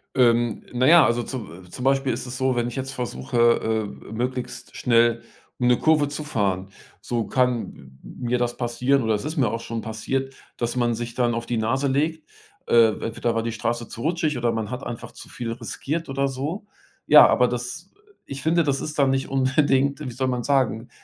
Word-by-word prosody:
Ähm. 120 Hz, -3 st, +3 dB
Na 125 Hz, +1 st, +2 dB
ja, 165 Hz, -3 st, +8 dB
also 120 Hz, 0 st, +1 dB
zu 95 Hz, -9 st, -7 dB
zum 125 Hz, -, -7 dB
Beispiel 135 Hz, -1 st, +2 dB
ist -, -, -5 dB
es 125 Hz, +1 st, -6 dB
so, 130 Hz, -1 st, +1 dB
wenn 120 Hz, 0 st, 0 dB
ich 120 Hz, -, -6 dB
jetzt 135 Hz, 0 st, -4 dB
versuche, 120 Hz, -, -4 dB, 0.6 s
äh, -, -, -15 dB
äh -, -, -10 dB
möglichst 125 Hz, +2 st, -4 dB
schnell 115 Hz, -1 st, +3 dB, 0.4 s
um 125 Hz, -, +2 dB
'ne 125 Hz, -, +5 dB
Kurve 155 Hz, -2 st, +3 dB
zu 150 Hz, +1 st, -5 dB
fahren, 100 Hz, -9 st, -1 dB, 0.3 s
so 115 Hz, -3 st, -2 dB
kann 125 Hz, -1 st, +1 dB
m 65 Hz, -2 st, -16 dB
m -, -, -12 dB
mir 125 Hz, 0 st, 0 dB
das 120 Hz, 0 st, -1 dB
passieren 125 Hz, +2 st, +1 dB
oder 110 Hz, -1 st, +1 dB
es 105 Hz, -, -4 dB
ist 155 Hz, +1 st, -4 dB
mir 125 Hz, -6 st, +3 dB
auch 115 Hz, +1 st, -3 dB
schon 115 Hz, -1 st, -4 dB
passiert, 135 Hz, +5 st, -3 dB, 0.2 s
dass 120 Hz, +1 st, -2 dB
man 120 Hz, -1 st, +1 dB
sich 120 Hz, +1 st, -5 dB
dann 120 Hz, -2 st, +1 dB
auf 115 Hz, 0 st, -3 dB
die 120 Hz, -, -1 dB
Nase 130 Hz, +6 st, 0 dB
legt, 155 Hz, -, -1 dB, 0.4 s
äh, 115 Hz, -1 st, +6 dB, 0.2 s
entweder 115 Hz, +1 st, -1 dB
war 115 Hz, -, 0 dB
die 115 Hz, -, -2 dB
Straße 115 Hz, +1 st, -2 dB
zu 115 Hz, -, -9 dB
rutschig 155 Hz, -3 st, 0 dB
oder 120 Hz, -1 st, +1 dB
man 110 Hz, -2 st, -3 dB
hat 125 Hz, +3 st, -5 dB
einfach 120 Hz, -1 st, -6 dB
zu -, -, -12 dB
viel 115 Hz, -2 st, -5 dB
riskiert 135 Hz, +7 st, -4 dB
oder 135 Hz, 0 st, 0 dB
so. 145 Hz, +10 st, -4 dB, 0.4 s
Ja, -, -, +9 dB
aber 125 Hz, -, +3 dB
das 125 Hz, +10 st, -5 dB, 0.4 s
ich 140 Hz, 0 st, -7 dB
finde, 165 Hz, +1 st, +2 dB
das 140 Hz, -2 st, 0 dB
ist 155 Hz, -, -5 dB
dann 135 Hz, -1 st, +4 dB
nicht 135 Hz, 0 st, 0 dB
unbedingt 135 Hz, +1 st, +2 dB
wie 130 Hz, -5 st, -5 dB
soll 130 Hz, +2 st, -2 dB
man 125 Hz, -2 st, -1 dB
sagen, 130 Hz, -4 st, +1 dB
125 Hz, 215 wpm, -24 LUFS, 115-135 Hz, 0.6 s, Ja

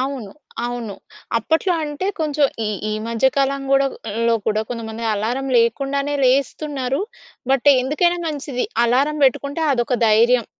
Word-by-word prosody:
అవును. 260 Hz, -6 st, -3 dB, 0.4 s
అవును. 240 Hz, -4 st, -5 dB, 0.4 s
అప్పట్లో 320 Hz, -, +1 dB
అంటే 295 Hz, +5 st, -4 dB
కొంచెం 295 Hz, -2 st, +2 dB, 0.2 s
ఈ -, -, -1 dB, 0.2 s
ఈ -, -, -1 dB, 0.2 s
మధ్య 230 Hz, +3 st, +1 dB
కాలం 275 Hz, 0 st, +1 dB
గూడా 275 Hz, 0 st, +4 dB, 0.4 s
లో 230 Hz, -, +4 dB
కూడ 215 Hz, -1 st, +1 dB
కొంతమంది 230 Hz, -1 st, -5 dB
అలారం 240 Hz, +6 st, -2 dB
లేకుండానే 275 Hz, +5 st, +1 dB
లేస్తున్నారు. 270 Hz, +1 st, 0 dB, 0.5 s
బట్ 270 Hz, +1 st, +3 dB
ఎందుకైనా 345 Hz, +6 st, +1 dB
మంచిది 280 Hz, -4 st, -3 dB, 0.2 s
అలారం 275 Hz, +6 st, +1 dB
బెట్టుకుంటే 280 Hz, +4 st, 0 dB
అదొక 245 Hz, 0 st, 0 dB
ధైర్యం. 230 Hz, +2 st, +4 dB
270 Hz, 130 wpm, -20 LUFS, 235-285 Hz, 0.5 s, గూడా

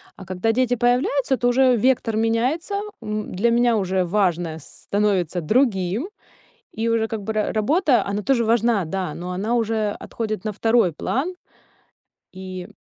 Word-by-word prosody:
А 190 Hz, -, -11 dB
когда 185 Hz, +5 st, 0 dB
дети 250 Hz, +1 st, +1 dB
появляются, 250 Hz, +3 st, +1 dB
то 245 Hz, -, +1 dB
уже 255 Hz, +1 st, +4 dB
вектор 230 Hz, -1 st, +1 dB
меняется, 245 Hz, -, 0 dB, 0.3 s
м, 215 Hz, 0 st, -4 dB
для 205 Hz, +6 st, +2 dB
меня 240 Hz, -1 st, +3 dB
уже 190 Hz, -2 st, 0 dB
важное 175 Hz, -4 st, 0 dB
становится 190 Hz, +1 st, -1 dB
другим. 215 Hz, -, +1 dB, 0.6 s
И 225 Hz, +1 st, -1 dB
уже 225 Hz, -1 st, +1 dB
как 220 Hz, -1 st, -4 dB
бы 220 Hz, -, -3 dB
ра 215 Hz, -1 st, 0 dB
работа, 275 Hz, -, +2 dB
она 200 Hz, +1 st, -2 dB
тоже 245 Hz, +1 st, +2 dB
важна, 230 Hz, -3 st, +2 dB
да, 180 Hz, -1 st, -3 dB
но 180 Hz, +1 st, -6 dB
она 205 Hz, +6 st, -1 dB
уже 220 Hz, -2 st, 0 dB
отходит 215 Hz, -4 st, -4 dB
на 215 Hz, -, -1 dB
второй 225 Hz, -2 st, +2 dB
план. 275 Hz, -, -2 dB, 1.0 s
И 185 Hz, -1 st, -7 dB
220 Hz, 155 wpm, -22 LUFS, 190-240 Hz, 1.0 s, уже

